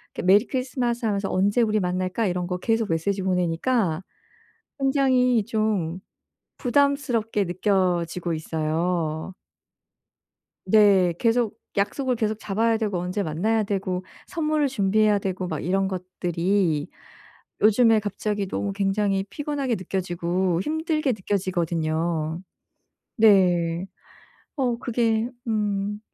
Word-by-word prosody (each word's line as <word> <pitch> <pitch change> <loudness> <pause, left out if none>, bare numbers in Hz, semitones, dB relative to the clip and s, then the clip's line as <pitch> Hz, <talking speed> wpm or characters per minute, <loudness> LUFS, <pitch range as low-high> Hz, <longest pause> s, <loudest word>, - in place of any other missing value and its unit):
이렇게 - - -3
"메리 200 +5 +6
크리스마스!" 250 -3 -2
하면서 200 -2 0
"언제 200 +5 +2
우리 215 -2 +2
만날까?" 185 +4 -1
이런 180 -1 -2
거 180 - -2
계속 225 +2 0
메시지 190 +5 0
보내니까 180 +1 0 0.8
굉장히 260 -4 +3
좀 210 -6 -1 0.6
부담스럽게 245 -6 +1
느껴지고 180 -2 0
있어요. 160 +1 -2 1.3
네. 190 -3 +5
계속 230 -1 +1 0.2
약속을 250 +6 0
계속 220 -1 -1
잡아야 220 +2 +1
되고 210 -4 -1
언제 180 +3 -2
만나야 200 +7 0
되고 190 -2 -2 0.2
선물을 305 -3 0
준비해야 210 -3 +2
되고 190 -1 -3
막 155 -3 -3
이런 195 +3 +1
것들이 180 -3 -1 0.7
요즘에 220 +1 +5
갑자기 205 0 -3
너무 200 +1 -2
굉장히 195 0 0
피곤하게 285 -4 -2
느껴지고 180 -1 -1
힘들게 310 - 0
느껴지거든요. 170 -4 -1 0.8
네. 180 -5 +4 0.7
어 250 -5 0
그게 230 -2 0 0.2
음 205 -2 -1
200 Hz, 265 characters per minute, -24 LUFS, 180-225 Hz, 1.3 s, 메리